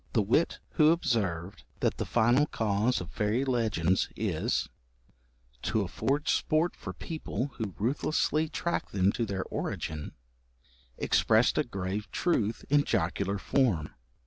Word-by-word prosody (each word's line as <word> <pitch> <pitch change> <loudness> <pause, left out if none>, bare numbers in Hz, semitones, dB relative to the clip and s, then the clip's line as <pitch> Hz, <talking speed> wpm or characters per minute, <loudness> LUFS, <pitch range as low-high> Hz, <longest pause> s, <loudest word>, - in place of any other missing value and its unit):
The 110 - +3
wit 120 +11 +2
who 155 -1 +5
observed 100 - 0 0.2
that - - +1
the - - -3
final 125 +6 +3
cause 110 +1 0
of - - -8
fairy 110 +5 0
legends 110 -9 +1
is - - -1 0.9
'to 105 +2 0
afford 140 - -1
sport 160 +2 +2
for - - -7
people 145 -5 -4
who 105 -5 -3
ruthlessly 150 +6 +1
track 170 +2 -2
them 95 0 +2
to 115 +1 -2
their 95 -2 -2
origin,' 75 -1 -4 0.8
expressed 115 +6 +3
a - - +3
grave 100 -3 -4
truth 115 - 0
in 145 +1 +4
jocular 100 +1 0
form. 100 - +1
110 Hz, 130 wpm, -29 LUFS, 100-140 Hz, 0.9 s, who